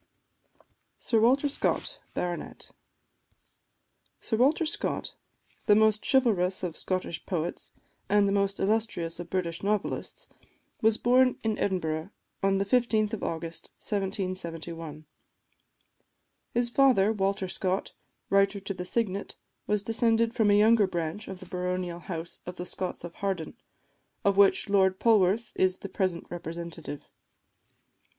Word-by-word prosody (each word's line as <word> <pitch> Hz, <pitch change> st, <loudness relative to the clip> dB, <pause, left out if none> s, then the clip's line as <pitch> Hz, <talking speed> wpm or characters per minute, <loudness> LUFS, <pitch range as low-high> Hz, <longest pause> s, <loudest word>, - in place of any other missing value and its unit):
SIR 225 Hz, -, +1 dB
WALTER 260 Hz, +6 st, +4 dB
SCOTT, 285 Hz, -, -1 dB, 0.2 s
BART. 175 Hz, -1 st, -4 dB, 1.5 s
Sir 225 Hz, -, -1 dB
Walter 285 Hz, +8 st, +3 dB
Scott, 320 Hz, -, -1 dB, 0.5 s
the 205 Hz, -, +7 dB
most 215 Hz, 0 st, +3 dB
chivalrous 195 Hz, -9 st, +2 dB
of 170 Hz, -3 st, -3 dB
Scottish 185 Hz, -3 st, -3 dB
poets, 175 Hz, -3 st, -3 dB, 0.4 s
and 205 Hz, 0 st, +4 dB
the -, -, +1 dB
most 200 Hz, 0 st, +1 dB
illustrious 195 Hz, -6 st, 0 dB
of 175 Hz, -1 st, -7 dB
British 170 Hz, -2 st, -2 dB
novelists, 205 Hz, 0 st, -2 dB, 0.5 s
was 220 Hz, 0 st, +4 dB
born 250 Hz, +1 st, +4 dB
in 220 Hz, -1 st, +1 dB
Edinburgh, 160 Hz, -3 st, -1 dB, 0.3 s
on 195 Hz, 0 st, +2 dB
the 195 Hz, -, 0 dB
15th 220 Hz, -1 st, +2 dB
of 220 Hz, -, -3 dB
August 165 Hz, 0 st, -5 dB
1771. 170 Hz, -6 st, -4 dB, 1.5 s
His 240 Hz, 0 st, 0 dB
father, 240 Hz, -6 st, +4 dB
Walter 195 Hz, -2 st, 0 dB
Scott, 185 Hz, +1 st, -2 dB, 0.4 s
Writer 195 Hz, 0 st, +3 dB
to 195 Hz, 0 st, -4 dB
the 180 Hz, -1 st, -6 dB
Signet, 200 Hz, -1 st, -2 dB, 0.3 s
was 210 Hz, -1 st, +1 dB
descended 225 Hz, +1 st, +2 dB
from 220 Hz, -3 st, +3 dB
a 205 Hz, -, +5 dB
younger 215 Hz, -1 st, +5 dB
branch 175 Hz, +3 st, -3 dB
of 190 Hz, -1 st, -7 dB
the -, -, -9 dB
baronial 180 Hz, -1 st, -3 dB
house 170 Hz, -1 st, -6 dB
of 180 Hz, -, -5 dB
the 180 Hz, -, -5 dB
Scotts 185 Hz, -1 st, -4 dB
of 170 Hz, -1 st, -7 dB
Harden, 190 Hz, -2 st, -3 dB, 0.7 s
of 200 Hz, -1 st, +4 dB
which 200 Hz, 0 st, +4 dB
Lord 190 Hz, -2 st, +3 dB
Polwarth 215 Hz, 0 st, +3 dB
is 185 Hz, 0 st, +2 dB
the 200 Hz, -, -8 dB
present 185 Hz, -3 st, -1 dB
representative. 170 Hz, -3 st, -6 dB
195 Hz, 130 wpm, -28 LUFS, 180-220 Hz, 1.5 s, the